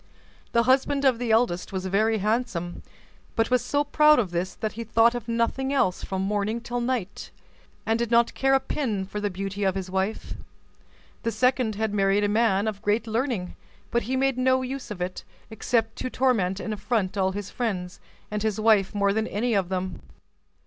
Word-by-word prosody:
The 235 Hz, -, +4 dB
husband 275 Hz, +2 st, +2 dB
of 255 Hz, -3 st, +4 dB
the 245 Hz, -2 st, -2 dB
eldest 220 Hz, -6 st, +2 dB
was 190 Hz, -1 st, -3 dB
very 215 Hz, +4 st, +2 dB
handsome, 210 Hz, -5 st, -2 dB, 0.5 s
but 225 Hz, +1 st, +1 dB
was 250 Hz, -1 st, +4 dB
so 285 Hz, +4 st, +1 dB
proud 300 Hz, +1 st, +5 dB
of 210 Hz, -8 st, 0 dB
this 175 Hz, +2 st, -2 dB
that 215 Hz, -, -3 dB
he 230 Hz, -, -6 dB
thought 230 Hz, +1 st, +4 dB
of 240 Hz, -2 st, -5 dB
nothing 235 Hz, +3 st, 0 dB
else 190 Hz, -10 st, +1 dB
from 190 Hz, 0 st, -2 dB
morning 210 Hz, +3 st, -1 dB
till 240 Hz, +1 st, -4 dB
night, 235 Hz, -6 st, -3 dB, 0.6 s
and 225 Hz, +1 st, +1 dB
did 235 Hz, -1 st, -1 dB
not 235 Hz, 0 st, +3 dB
care 270 Hz, 0 st, +2 dB
a -, -, +4 dB
pin 240 Hz, -7 st, -2 dB
for 210 Hz, +2 st, -5 dB
the 205 Hz, -, 0 dB
beauty 195 Hz, +2 st, -4 dB
of 190 Hz, -1 st, +1 dB
his 190 Hz, -1 st, -4 dB
wife. 190 Hz, +3 st, -2 dB, 0.9 s
The 230 Hz, -, -1 dB
second 250 Hz, 0 st, +1 dB
had 220 Hz, 0 st, -1 dB
married 200 Hz, 0 st, +2 dB
a -, -, +3 dB
man 210 Hz, -1 st, +2 dB
of 205 Hz, -2 st, -3 dB
great 215 Hz, +2 st, +1 dB
learning; 225 Hz, -5 st, -2 dB, 0.4 s
but 235 Hz, -, +2 dB
he 260 Hz, -, +1 dB
made 265 Hz, -1 st, +1 dB
no 260 Hz, 0 st, +3 dB
use 265 Hz, +1 st, -5 dB
of 200 Hz, -4 st, -6 dB
it, 180 Hz, +1 st, -4 dB, 0.3 s
except 225 Hz, 0 st, 0 dB
to 255 Hz, -, -3 dB
torment 220 Hz, -8 st, +1 dB
and 190 Hz, +4 st, -3 dB
affront 210 Hz, -2 st, -1 dB
all 190 Hz, -1 st, +1 dB
his 205 Hz, -1 st, -5 dB
friends, 185 Hz, -7 st, -3 dB, 0.3 s
and 210 Hz, 0 st, -2 dB
his 220 Hz, 0 st, -1 dB
wife 215 Hz, -3 st, +3 dB
more 200 Hz, -1 st, +2 dB
than 220 Hz, +1 st, 0 dB
any 230 Hz, +4 st, -1 dB
of 195 Hz, -4 st, +1 dB
them. 185 Hz, -1 st, -3 dB
220 Hz, 195 wpm, -25 LUFS, 195-245 Hz, 0.9 s, proud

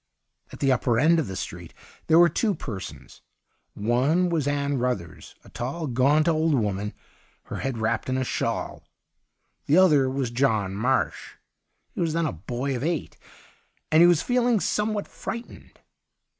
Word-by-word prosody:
At -, -, -11 dB
the 135 Hz, -1 st, +3 dB
upper 120 Hz, -2 st, +1 dB
end 165 Hz, +4 st, +4 dB
of 160 Hz, -, -1 dB
the 95 Hz, -, -6 dB
street 90 Hz, -2 st, -7 dB, 0.3 s
there 160 Hz, -, +5 dB
were 175 Hz, 0 st, +8 dB
two 200 Hz, +5 st, 0 dB
persons. 110 Hz, -, -8 dB, 0.5 s
One 130 Hz, -, +1 dB
was 160 Hz, -5 st, 0 dB
Ann 140 Hz, -1 st, 0 dB
Ruthers, 110 Hz, -10 st, -4 dB
a -, -, -16 dB
tall, 130 Hz, +9 st, -4 dB
gaunt 140 Hz, +4 st, +2 dB
old 160 Hz, -2 st, +2 dB
woman, 105 Hz, -3 st, -2 dB, 0.5 s
her -, -, -7 dB
head 135 Hz, -3 st, -3 dB
wrapped 110 Hz, +2 st, -1 dB
in 130 Hz, -, 0 dB
a 130 Hz, -, 0 dB
shawl; -, -, -3 dB, 0.9 s
the 150 Hz, -, +4 dB
other 150 Hz, -8 st, +5 dB
was 130 Hz, -2 st, -2 dB
John 110 Hz, -7 st, +1 dB
Marsh. 125 Hz, +7 st, -1 dB, 0.6 s
He -, -, -4 dB
was 165 Hz, -2 st, 0 dB
then 165 Hz, 0 st, 0 dB
a -, -, -2 dB
boy 120 Hz, -, -4 dB
of 125 Hz, -, -4 dB
eight, 165 Hz, 0 st, -2 dB, 0.8 s
and 155 Hz, +1 st, +6 dB
he 175 Hz, -, +8 dB
was 175 Hz, -3 st, +3 dB
feeling 245 Hz, -2 st, +2 dB
some 210 Hz, +2 st, 0 dB
what 205 Hz, -, -3 dB
frightened. 235 Hz, +1 st, -8 dB
135 Hz, 165 wpm, -25 LUFS, 120-165 Hz, 0.9 s, were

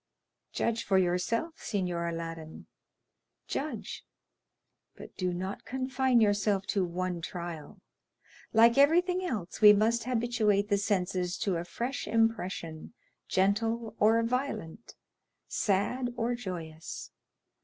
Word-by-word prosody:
"Judge 230 Hz, 0 st, -1 dB
for 190 Hz, -, +2 dB
yourself, 190 Hz, -, 0 dB
Signor 180 Hz, -4 st, -2 dB
Aladdin—judge, 165 Hz, -, -7 dB, 0.9 s
but -, -, -12 dB
do 185 Hz, -2 st, -1 dB
not 185 Hz, +3 st, -4 dB
confine 260 Hz, -1 st, +1 dB
yourself 205 Hz, -2 st, +2 dB
to 195 Hz, -1 st, 0 dB
one 180 Hz, 0 st, -3 dB
trial. 170 Hz, -3 st, -7 dB, 0.7 s
Like 230 Hz, +3 st, +6 dB
everything 355 Hz, +5 st, +4 dB
else, 215 Hz, -, -4 dB
we 210 Hz, -1 st, +10 dB
must 225 Hz, +2 st, +2 dB
habituate 225 Hz, -4 st, +1 dB
the 200 Hz, -1 st, +2 dB
senses 180 Hz, -3 st, 0 dB
to 190 Hz, -4 st, 0 dB
a 165 Hz, -, -3 dB
fresh 240 Hz, +9 st, -4 dB
impression, 205 Hz, -7 st, -1 dB, 0.3 s
gentle 220 Hz, +3 st, 0 dB
or 225 Hz, +2 st, +4 dB
violent, 235 Hz, -5 st, -3 dB, 0.5 s
sad 225 Hz, +5 st, 0 dB
or 235 Hz, +1 st, 0 dB
joyous. 170 Hz, -8 st, -6 dB
205 Hz, 105 wpm, -30 LUFS, 180-235 Hz, 0.9 s, we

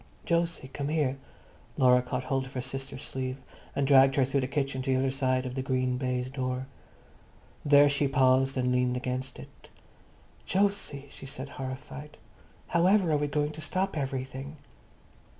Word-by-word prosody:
"Jose, 170 Hz, -5 st, 0 dB
come 140 Hz, +1 st, -4 dB
here." 145 Hz, -3 st, 0 dB, 0.6 s
Laura 125 Hz, -1 st, +5 dB
caught 125 Hz, 0 st, -3 dB
hold 130 Hz, 0 st, -1 dB
of 130 Hz, -, -13 dB
her 125 Hz, -, -2 dB
sister's 135 Hz, +1 st, -6 dB
sleeve 130 Hz, -2 st, -4 dB, 0.4 s
and 140 Hz, -, +1 dB
dragged 135 Hz, -1 st, +6 dB
her 135 Hz, -, +4 dB
through 135 Hz, +1 st, 0 dB
the 130 Hz, -, -1 dB
kitchen 135 Hz, -1 st, -1 dB
to 135 Hz, -, -4 dB
the 130 Hz, -, +3 dB
other 130 Hz, 0 st, +1 dB
side 130 Hz, -1 st, 0 dB
of 125 Hz, -, -4 dB
the 130 Hz, -, -2 dB
green 130 Hz, -1 st, 0 dB
baize 125 Hz, -1 st, -2 dB
door. 130 Hz, -1 st, -2 dB, 1.0 s
There 145 Hz, 0 st, +7 dB
she 145 Hz, 0 st, +2 dB
paused 135 Hz, 0 st, +3 dB
and 125 Hz, -1 st, +1 dB
leaned 125 Hz, 0 st, +1 dB
against 130 Hz, +1 st, -4 dB
it. -, -, -14 dB, 0.8 s
"Jose!" 195 Hz, -8 st, 0 dB
she -, -, -10 dB
said, 130 Hz, +1 st, -6 dB
horrified, 135 Hz, +3 st, -7 dB, 0.5 s
"however 180 Hz, +1 st, +4 dB
are 150 Hz, -, +3 dB
we 145 Hz, 0 st, 0 dB
going 150 Hz, +1 st, 0 dB
to 155 Hz, +1 st, -8 dB
stop 185 Hz, +5 st, -1 dB
everything?" 135 Hz, 0 st, -4 dB
135 Hz, 170 wpm, -29 LUFS, 130-145 Hz, 1.0 s, There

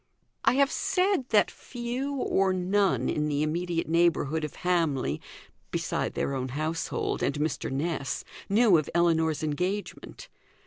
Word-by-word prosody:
I -, -, +4 dB
have 275 Hz, +1 st, +3 dB
said 365 Hz, -8 st, +1 dB
that 215 Hz, -2 st, +4 dB
few 250 Hz, +3 st, -4 dB
or 195 Hz, -7 st, +1 dB
none 185 Hz, -, +1 dB
in 150 Hz, 0 st, 0 dB
the 145 Hz, 0 st, 0 dB
immediate 170 Hz, +2 st, -1 dB
neighbourhood 160 Hz, -2 st, +2 dB
of 150 Hz, -, -5 dB
Hamley, 155 Hz, -, +1 dB, 0.5 s
beside -, -, -2 dB
their 140 Hz, -, -1 dB
own 130 Hz, -1 st, -2 dB
household 155 Hz, +5 st, -2 dB
and 140 Hz, -, 0 dB
Mr. 150 Hz, -1 st, -2 dB
Ness, 140 Hz, 0 st, -2 dB, 0.3 s
knew 205 Hz, -4 st, +5 dB
of 155 Hz, -, -4 dB
Ellinor's 160 Hz, -3 st, +2 dB
engagement. 180 Hz, +7 st, -3 dB
170 Hz, 135 wpm, -28 LUFS, 150-205 Hz, 0.5 s, knew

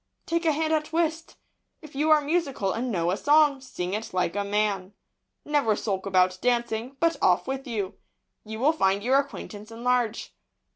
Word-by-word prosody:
Take 335 Hz, 0 st, -1 dB
a 320 Hz, -, +4 dB
hand 315 Hz, +1 st, 0 dB
at 310 Hz, 0 st, -1 dB
whist. 325 Hz, 0 st, -1 dB, 0.5 s
If 310 Hz, -, -12 dB
you 300 Hz, +3 st, 0 dB
are 310 Hz, -1 st, +6 dB
musical, 285 Hz, -, -1 dB
and 245 Hz, +2 st, -2 dB
know 175 Hz, -3 st, 0 dB
a 190 Hz, -, -1 dB
song, 290 Hz, -1 st, +4 dB
sing 185 Hz, -8 st, -5 dB
it 215 Hz, -2 st, -4 dB
like 180 Hz, 0 st, 0 dB
a 205 Hz, -, 0 dB
man. 200 Hz, -2 st, -1 dB, 0.5 s
Never 285 Hz, -8 st, +2 dB
sulk 195 Hz, -2 st, -3 dB
about 185 Hz, -1 st, +2 dB
dancing, 240 Hz, +1 st, -1 dB
but 335 Hz, 0 st, +2 dB
off -, -, +3 dB
with 270 Hz, +1 st, -4 dB
you. 205 Hz, -5 st, -4 dB, 0.4 s
You 220 Hz, 0 st, -7 dB
will 300 Hz, +4 st, +4 dB
find 195 Hz, -8 st, +1 dB
your 260 Hz, +3 st, +4 dB
acquaintance 215 Hz, -6 st, -6 dB
enlarge. 235 Hz, -1 st, -1 dB
245 Hz, 180 wpm, -26 LUFS, 205-295 Hz, 0.5 s, are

